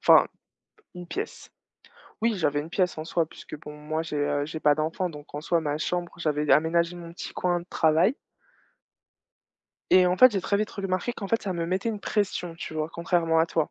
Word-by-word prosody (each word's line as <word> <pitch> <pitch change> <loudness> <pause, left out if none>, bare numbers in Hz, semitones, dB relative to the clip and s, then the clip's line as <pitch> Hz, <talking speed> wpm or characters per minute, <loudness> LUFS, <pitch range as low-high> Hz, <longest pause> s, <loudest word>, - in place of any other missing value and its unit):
enfin - - +7 0.7
une 180 -1 -8
pièce. 415 - -6 0.7
Oui, 230 -1 +3
j'avais 145 -5 +1
une 160 +3 -8
pièce 180 -2 +1
en 155 - -4
soi 165 -1 0
puisque 155 - -10
bon 150 -1 -9
moi 155 +2 -3
j'ai, 160 -2 -5
heu, 145 0 0
j'ai 160 0 -6
pas 150 -1 +5
d'enfant 165 +4 -1
donc 150 -1 -12
en 145 - -3
soi 170 +1 +1
ma 150 -1 -2
chambre, 175 +2 -2
j'avais 150 -2 0
aménagé 170 +4 +3
mon 170 -1 -9
petit - - -7
coin 175 -1 0
de 175 - -13
travail. 160 - +3 1.7
Et 185 -1 +7
en 180 - +2
fait, 255 +2 +8
j'ai 195 - 0
très 200 - +1
vite 215 +1 -1
remarqué 195 +3 -2
qu'en 200 -4 -6
fait, 230 - +1
ça 195 - -2
me 170 -2 -2
mettait 190 +5 -1
une 215 -2 -3
pression, 190 -5 -1
tu 160 - -7
vois? 155 0 -1
Contrairement 170 -1 +1
à 160 - +4
toi. 160 -2 0
170 Hz, 210 wpm, -26 LUFS, 155-185 Hz, 1.7 s, fait